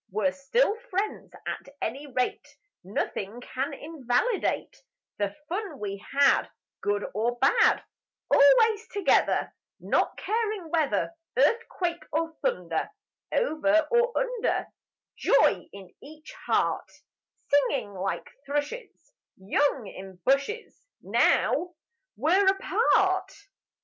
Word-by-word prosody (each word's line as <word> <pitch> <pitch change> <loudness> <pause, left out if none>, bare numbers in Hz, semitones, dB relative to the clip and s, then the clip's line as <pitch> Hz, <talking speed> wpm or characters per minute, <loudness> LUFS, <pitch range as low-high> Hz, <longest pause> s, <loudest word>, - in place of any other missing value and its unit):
We're 215 +8 +1
still 410 - +1
friends 400 +2 -2
at - - -5
any 275 +6 -4
rate; 250 0 -2 0.3
Nothing 200 +3 -3
can 260 +2 -3
invalidate 305 - -1 0.4
The 205 -1 -1
fun 365 -4 -4
we 200 -1 -5 0.2
had, 280 -1 +5 0.3
Good 205 0 0
or 235 +4 0
bad, 270 +3 +4 0.5
Always 415 - +5
together, 405 -3 +2 0.3
Not - - 0
caring 425 -6 -2
whether 320 0 +1 0.2
Earthquake 355 - +1
or 325 +1 -1
thunder, - - -1 0.4
Over 310 -8 +2
or 475 +1 +3
under; - - 0 0.5
Joy - - +3
in 195 -2 -12
each 310 +2 -12
heart; - - +1 0.6
Singing 275 -6 +2
like 195 +1 -3 0.2
thrushes 290 - -4 0.3
Young 240 +6 +1
in 190 -1 -9
bushes: 280 - 0 0.2
Now 355 0 +2 0.4
we're 380 +5 +3
apart. 385 0 +2
295 Hz, 100 wpm, -27 LUFS, 245-390 Hz, 0.6 s, had